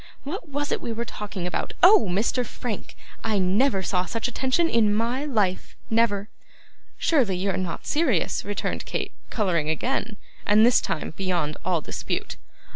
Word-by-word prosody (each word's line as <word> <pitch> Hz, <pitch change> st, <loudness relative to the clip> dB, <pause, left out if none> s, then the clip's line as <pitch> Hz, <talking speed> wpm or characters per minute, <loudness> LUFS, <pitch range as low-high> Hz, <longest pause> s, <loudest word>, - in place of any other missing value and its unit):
What 330 Hz, +3 st, -6 dB
was 290 Hz, +1 st, -2 dB
it -, -, 0 dB
we 235 Hz, -, -4 dB
were 230 Hz, +1 st, -3 dB
talking 205 Hz, -5 st, -5 dB
about? 180 Hz, -, -2 dB
Oh! 380 Hz, -, +8 dB
Mr. 215 Hz, +7 st, +1 dB
Frank. 230 Hz, -2 st, -6 dB, 0.3 s
I 220 Hz, -2 st, +1 dB
never 195 Hz, +3 st, +2 dB
saw 180 Hz, -1 st, 0 dB
such 230 Hz, +4 st, -2 dB
attention 260 Hz, +7 st, +1 dB
in 230 Hz, -8 st, +3 dB
MY 240 Hz, +6 st, 0 dB
life, 210 Hz, -10 st, 0 dB, 0.2 s
never.' 215 Hz, -3 st, +2 dB, 0.7 s
'Surely 245 Hz, -, +2 dB
you 195 Hz, +2 st, 0 dB
are -, -, -2 dB
not 185 Hz, -3 st, -3 dB
serious,' 285 Hz, -, +1 dB
returned 205 Hz, 0 st, -3 dB
Kate, -, -, -3 dB, 0.2 s
colouring 170 Hz, -8 st, 0 dB
again; 235 Hz, -, -1 dB, 0.3 s
and 210 Hz, +2 st, +5 dB
this 245 Hz, -, +5 dB
time 155 Hz, -, -3 dB
beyond 175 Hz, -6 st, -1 dB
all 175 Hz, -4 st, +1 dB
dispute. -, -, -4 dB
215 Hz, 160 wpm, -25 LUFS, 185-250 Hz, 0.7 s, Oh